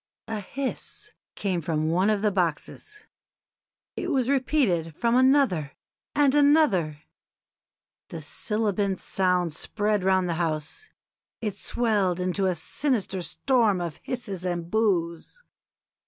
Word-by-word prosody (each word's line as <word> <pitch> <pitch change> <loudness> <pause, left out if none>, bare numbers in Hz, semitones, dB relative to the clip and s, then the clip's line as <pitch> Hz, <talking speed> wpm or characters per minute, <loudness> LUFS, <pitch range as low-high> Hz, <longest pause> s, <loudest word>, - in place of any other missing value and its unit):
A 220 -1 -3
hiss 265 +7 -5 0.2
came 185 -4 -1
from 155 -1 -1
one 185 +5 +2
of 210 -1 +1
the 210 - +3
boxes; 190 - -3 0.9
it 360 - -3
was 265 -5 +1
repeated 245 - +1
from 235 +4 +1
another, 255 - +3 0.4
and 285 -2 +4
another. 285 - +3 1.0
The 165 - -7
sibilant 205 +3 -1
sound 180 -3 0
spread 210 +4 -1
round 190 -1 +2
the 170 - 0
house; 160 - -3 0.5
it 210 -4 -3
swelled 205 -6 0
into 185 +1 0
a 185 - +1
sinister 200 - -1
storm 215 - +2
of 170 -3 -4
hisses 205 -8 -5
and 175 -2 -3
boos. 195 - 0
195 Hz, 120 wpm, -26 LUFS, 175-245 Hz, 1.0 s, and